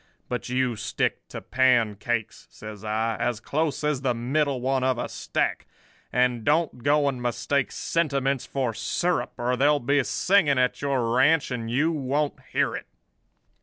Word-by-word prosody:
But 125 Hz, 0 st, -3 dB
you 125 Hz, -1 st, 0 dB
stick -, -, -2 dB
to -, -, -7 dB
pancakes,' 120 Hz, -3 st, +1 dB
says 105 Hz, -1 st, -10 dB
I, 110 Hz, +1 st, -1 dB
'as 120 Hz, -3 st, -1 dB
close 150 Hz, +4 st, -2 dB
as 150 Hz, -3 st, 0 dB
the 125 Hz, -3 st, 0 dB
middle 135 Hz, +3 st, 0 dB
one 130 Hz, +1 st, 0 dB
of 130 Hz, -1 st, +1 dB
a -, -, -2 dB
stack; -, -, -2 dB, 0.4 s
and 125 Hz, -2 st, +1 dB
don't 150 Hz, -2 st, +1 dB
go 145 Hz, +2 st, +3 dB
and 130 Hz, -3 st, -2 dB
mistake 120 Hz, +3 st, 0 dB
sentiments 140 Hz, -5 st, -1 dB
for 130 Hz, -4 st, -1 dB
syrup, 165 Hz, +10 st, -1 dB
or 125 Hz, +1 st, 0 dB
there'll 145 Hz, +3 st, +3 dB
be 140 Hz, +2 st, +2 dB
singing 175 Hz, -3 st, +2 dB
at 125 Hz, 0 st, +1 dB
your 130 Hz, -5 st, 0 dB
ranch, 145 Hz, +3 st, +3 dB
and 115 Hz, -2 st, -3 dB
you 145 Hz, +8 st, +2 dB
won't 145 Hz, 0 st, -1 dB
hear -, -, +1 dB
it. -, -, -7 dB
130 Hz, 160 wpm, -25 LUFS, 120-145 Hz, 0.4 s, go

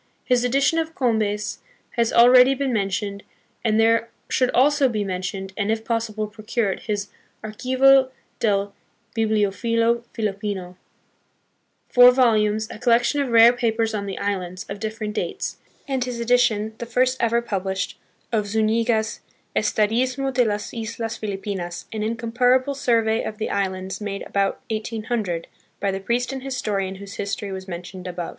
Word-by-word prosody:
His 250 Hz, -1 st, +2 dB
edition 275 Hz, +6 st, +2 dB
of 320 Hz, 0 st, -3 dB
Combes 215 Hz, -4 st, 0 dB, 0.3 s
has 235 Hz, -2 st, +1 dB
already 250 Hz, +2 st, +7 dB
been 270 Hz, -1 st, -1 dB
mentioned, 200 Hz, -1 st, -2 dB, 0.4 s
and 220 Hz, -1 st, +2 dB
there 230 Hz, +1 st, +3 dB, 0.2 s
should 255 Hz, -1 st, +2 dB
also 280 Hz, +1 st, +4 dB
be 215 Hz, -3 st, -1 dB
mentioned, 190 Hz, 0 st, -4 dB
and 205 Hz, 0 st, 0 dB
if 220 Hz, 0 st, -2 dB
possible 225 Hz, -2 st, -1 dB
procured, 215 Hz, -1 st, -2 dB
his 205 Hz, -2 st, -3 dB, 0.3 s
Archivo 260 Hz, +4 st, +4 dB, 0.3 s
del 200 Hz, -2 st, +1 dB, 0.4 s
Biblitifilo 230 Hz, +2 st, +1 dB
Filipino, 200 Hz, -4 st, -3 dB, 1.1 s
four 245 Hz, 0 st, +8 dB
volumes, 220 Hz, -4 st, +3 dB
a -, -, -9 dB
collection 245 Hz, +4 st, +3 dB
of 275 Hz, -, -2 dB
rare 230 Hz, +1 st, +7 dB
papers 225 Hz, -2 st, 0 dB
on 200 Hz, -1 st, -3 dB
the 195 Hz, -, -4 dB
islands, 185 Hz, -3 st, -3 dB
of 200 Hz, +1 st, -6 dB
differ 220 Hz, +1 st, -4 dB
ent 210 Hz, 0 st, -3 dB
dates; -, -, -3 dB, 0.3 s
and 265 Hz, -2 st, 0 dB
his 245 Hz, -2 st, -5 dB
edition, 235 Hz, -3 st, +2 dB
the 235 Hz, -, -5 dB
first 255 Hz, +1 st, +2 dB
ever 235 Hz, 0 st, +2 dB
published, 190 Hz, -4 st, -3 dB, 0.4 s
of 215 Hz, -3 st, 0 dB
Zuniga's 220 Hz, +1 st, +1 dB, 0.4 s
Estadismo 255 Hz, +5 st, +1 dB
de 250 Hz, -1 st, +4 dB
las 210 Hz, -2 st, -2 dB
Islas 225 Hz, 0 st, -4 dB
Filipinas, 195 Hz, -4 st, -4 dB
an 215 Hz, -, -3 dB
incomparable 245 Hz, +4 st, +1 dB
survey 230 Hz, -4 st, +1 dB
of 215 Hz, -, -5 dB
the 220 Hz, -, -3 dB
islands 190 Hz, -1 st, -2 dB
made 200 Hz, -1 st, -4 dB
about 195 Hz, -1 st, -1 dB
1800, 215 Hz, -5 st, -2 dB, 0.3 s
by 200 Hz, -, 0 dB
the 195 Hz, -, -3 dB
priest 240 Hz, +6 st, -1 dB
and 265 Hz, -, -5 dB
historian 210 Hz, -8 st, -2 dB
whose 200 Hz, +1 st, -10 dB
history 200 Hz, 0 st, -4 dB
was 190 Hz, 0 st, -6 dB
mentioned 180 Hz, +1 st, -7 dB
above. 175 Hz, -1 st, -4 dB
220 Hz, 150 wpm, -23 LUFS, 200-240 Hz, 1.1 s, four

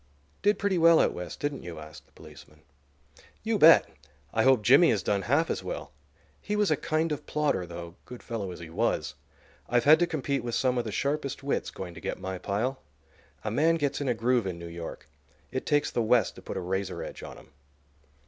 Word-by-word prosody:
"Did 205 Hz, -1 st, +3 dB
pretty 195 Hz, -3 st, 0 dB
well 165 Hz, 0 st, +6 dB
out -, -, +3 dB
West, 90 Hz, 0 st, -7 dB
didn't 145 Hz, -2 st, -3 dB
you?" 85 Hz, -1 st, -8 dB
asked 75 Hz, -1 st, -11 dB
the -, -, -30 dB
policeman. 75 Hz, +1 st, -15 dB, 0.8 s
"You -, -, 0 dB
bet! -, -, +8 dB, 0.5 s
I 110 Hz, -, +2 dB
hope 130 Hz, -3 st, +4 dB
Jimmy 135 Hz, -, +6 dB
has 105 Hz, -5 st, +1 dB
done 100 Hz, -1 st, 0 dB
half 145 Hz, +10 st, +2 dB
as -, -, -3 dB
well. -, -, -6 dB, 0.5 s
He 210 Hz, -, -2 dB
was 210 Hz, -4 st, +2 dB
a -, -, +4 dB
kind 155 Hz, +3 st, -1 dB
of 150 Hz, -, -4 dB
plodder, 145 Hz, -12 st, 0 dB
though, 85 Hz, 0 st, -8 dB
good 125 Hz, -, -10 dB
fellow 110 Hz, -5 st, -4 dB
as 90 Hz, -, -8 dB
he 80 Hz, -1 st, -9 dB
was. 110 Hz, +7 st, -1 dB, 0.6 s
I've 120 Hz, 0 st, +2 dB
had 155 Hz, +4 st, +7 dB
to 175 Hz, -, +2 dB
compete 140 Hz, -4 st, -2 dB
with 120 Hz, -1 st, -3 dB
some 125 Hz, -1 st, +1 dB
of 120 Hz, -, -2 dB
the 110 Hz, -, -4 dB
sharpest 140 Hz, +3 st, -2 dB
wits 140 Hz, -, -1 dB
going 90 Hz, -2 st, -8 dB
to 85 Hz, -, -11 dB
get -, -, -4 dB
my 95 Hz, -1 st, -5 dB
pile. 110 Hz, +8 st, -2 dB, 0.6 s
A 105 Hz, -, -2 dB
man 155 Hz, +8 st, +3 dB
gets 145 Hz, -3 st, -1 dB
in 140 Hz, -, -2 dB
a 125 Hz, -, +1 dB
groove 120 Hz, -1 st, +1 dB
in 90 Hz, -2 st, -4 dB
New 85 Hz, -, -8 dB
York. 85 Hz, 0 st, -8 dB, 0.4 s
It 130 Hz, -, -4 dB
takes 145 Hz, -1 st, +2 dB
the 120 Hz, -, 0 dB
West 115 Hz, +1 st, +3 dB
to -, -, -13 dB
put -, -, -6 dB
a -, -, -2 dB
razor 95 Hz, +1 st, -3 dB
edge -, -, -8 dB
on -, -, -9 dB
him." -, -, -17 dB
120 Hz, 220 wpm, -28 LUFS, 95-145 Hz, 0.8 s, bet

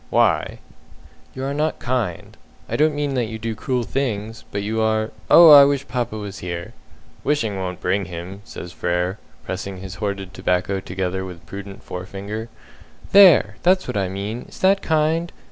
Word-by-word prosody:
"Why?" -, -, +2 dB, 0.8 s
"You 130 Hz, -, -5 dB
are 140 Hz, +1 st, -2 dB
not 155 Hz, +2 st, 0 dB
kind. 120 Hz, -9 st, -3 dB, 0.3 s
I -, -, -3 dB
don't 155 Hz, 0 st, +3 dB
mean 145 Hz, -1 st, -1 dB
that 125 Hz, -3 st, 0 dB
you 110 Hz, 0 st, -6 dB
do 115 Hz, 0 st, -3 dB
cruel 125 Hz, +2 st, -2 dB
things; 110 Hz, -2 st, -3 dB
but 100 Hz, 0 st, -3 dB
you 110 Hz, +2 st, -1 dB
are 110 Hz, 0 st, +1 dB, 0.2 s
oh, 165 Hz, -2 st, +9 dB
I 145 Hz, -1 st, +11 dB
wish 140 Hz, 0 st, +1 dB
papa 120 Hz, -3 st, -2 dB
was 100 Hz, -2 st, -7 dB
here!" 85 Hz, -1 st, -6 dB, 0.5 s
"Wishing 120 Hz, -9 st, 0 dB
won't 90 Hz, -1 st, -4 dB
bring 95 Hz, +2 st, 0 dB
him!" 90 Hz, +3 st, -8 dB
says 90 Hz, -4 st, -9 dB
Frere, 90 Hz, +4 st, -1 dB, 0.3 s
pressing 95 Hz, +1 st, -5 dB
his 95 Hz, 0 st, -8 dB
hoarded 100 Hz, -3 st, -3 dB
tobacco 95 Hz, +2 st, 0 dB
together 95 Hz, 0 st, -3 dB
with 90 Hz, -3 st, -9 dB
prudent 100 Hz, +3 st, -9 dB
forefinger. 100 Hz, +5 st, -6 dB, 0.6 s
"There! 175 Hz, -, +7 dB
That's 185 Hz, +1 st, +3 dB
what -, -, -4 dB
I 95 Hz, -2 st, 0 dB
mean! 100 Hz, +5 st, -5 dB
Is -, -, -13 dB
that 195 Hz, +1 st, +4 dB
kind? 160 Hz, +2 st, +1 dB
105 Hz, 170 wpm, -22 LUFS, 95-135 Hz, 0.8 s, I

